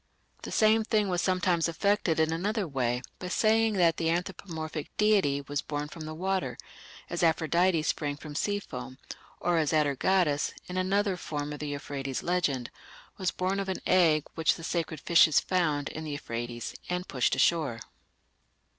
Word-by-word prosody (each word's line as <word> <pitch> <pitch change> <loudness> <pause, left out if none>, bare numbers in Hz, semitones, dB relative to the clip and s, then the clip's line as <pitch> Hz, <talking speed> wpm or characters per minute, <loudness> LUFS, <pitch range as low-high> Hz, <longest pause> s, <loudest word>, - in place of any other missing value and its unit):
The - - -7
same 220 0 +4
thing 215 -2 +1
was 180 -1 0
sometimes 180 -3 +2
effected 175 -1 +1
in 160 0 +2
another 200 +4 -1
way 125 -3 -1 0.2
by 180 - -5
saying 220 +3 +3
that 175 -4 +3
the 165 - 0
anthropomorphic 165 -3 -3
deity 200 -10 +3
was 145 +1 -3
born 145 0 -4
from 160 0 -8
the 155 0 -6
water, 190 +2 -1 0.5
as 175 - -3
Aphrodite 165 +1 +2
sprang 145 -1 -1
from 150 0 -9
sea 205 +7 0
foam, 130 -8 -8 0.4
or 175 -1 +1
as 155 0 +1
Atargatis, 150 +1 +2
in 180 - -7
another 190 +1 +1
form 150 -3 -4
of 150 - -7
the 150 - -4
Euphrates 140 -3 -4
legend,... 150 -9 0 0.5
was 185 -1 +1
born 190 +2 -1
of 195 -1 -3
an 190 - -3
egg 160 -5 +4
which 160 -1 +2
the 165 - -10
sacred 160 -2 -2
fishes 160 -1 +5
found 155 -6 0
in 160 - -6
the 155 -2 -4
Euphrates 120 -4 -5 0.2
and 180 +1 -2
pushed 125 -2 +1
ashore." 150 -9 +2
165 Hz, 165 wpm, -29 LUFS, 145-185 Hz, 0.5 s, fishes